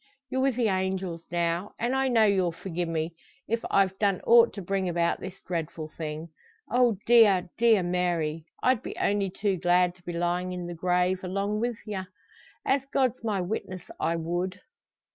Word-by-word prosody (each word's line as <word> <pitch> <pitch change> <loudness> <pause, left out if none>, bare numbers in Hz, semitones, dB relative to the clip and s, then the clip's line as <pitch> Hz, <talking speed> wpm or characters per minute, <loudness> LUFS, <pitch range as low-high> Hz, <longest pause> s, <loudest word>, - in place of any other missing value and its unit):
you're 260 - 0
wi' 270 - +4
the 240 -3 0
angels 190 -3 -1
now; 170 +2 -1
and 240 +3 0
I 265 0 +2
know 235 -3 +4
you'll 190 -4 +2
forgie 175 +1 -4
me, 165 0 -2 0.3
if 230 +1 -1
I've 195 -1 +2
done 200 -3 +2
ought 235 0 +6
to 200 - -5
bring 190 0 -1
about 170 0 +1
this 190 +1 -8
dreadful 160 -3 -4
thing. 155 +1 -5 0.4
Oh, 240 -3 +3
dear, 200 -7 +5
dear 225 -4 +4
Mary! 170 -3 -1 0.2
I'd 255 -3 +3
be - - -6
only 200 -1 +1
too 195 0 -1
glad 180 +1 +3
to 180 - -24
be 175 - -5
lyin' 175 +2 -1
in 180 -1 -5
the 175 - -5
grave 180 +2 +1
along 200 +3 -1
wi' 240 +1 0
ye. 205 -3 -3 0.6
As 275 0 +2
God's 255 -3 +1
my 210 -4 0
witness 185 -1 -4 0.2
I 165 - +1
would." 175 +3 -3
185 Hz, 180 wpm, -27 LUFS, 175-210 Hz, 0.6 s, ought